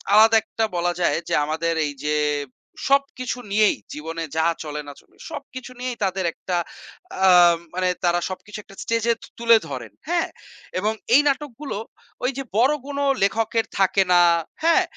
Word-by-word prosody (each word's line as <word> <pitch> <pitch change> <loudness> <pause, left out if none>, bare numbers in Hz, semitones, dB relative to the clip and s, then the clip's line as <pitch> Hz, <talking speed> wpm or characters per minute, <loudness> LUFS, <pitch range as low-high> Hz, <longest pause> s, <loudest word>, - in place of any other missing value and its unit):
আলাদা 225 +1 +7
একটা 225 0 -3
বলা 175 0 +1
যায় 170 - +2
যে - - -1
আমাদের 165 +2 -1
এইযে 150 +1 -2 0.7
সবকিছু 275 -2 +1
নিয়েই 215 0 +4 0.2
জীবনে 165 +2 -5
যা 160 - +3 0.2
চলে 150 -1 -5
না 145 - -7
চলে - - -30 0.2
সবকিছু 260 -4 -8
নিয়েই 250 -1 -3
তাদের 190 -1 0
একটা 180 - -4 0.7
আ - - +7 0.5
মানে 185 0 +1
তারা 175 0 +3
সবকিছু 210 +3 -7
একটা 195 - -16
স্টেজে 230 0 +1
তু - - -11
তুলে 230 -1 +6
ধরেন। 125 -5 -6 0.2
হ্যাঁ 345 -1 +1 0.5
এবং 215 +3 0 0.2
এই 290 - +8
নাটকগুলো 280 -4 -2 0.5
ওইযে 270 +1 -1
বড় 260 +6 +5
কোন 280 0 -4 0.2
লেখকের 225 +2 +1
থাকে 195 0 +4
না। 175 - +7 0.4
হ্যাঁ? 335 0 +5
215 Hz, 150 wpm, -23 LUFS, 175-255 Hz, 0.7 s, এই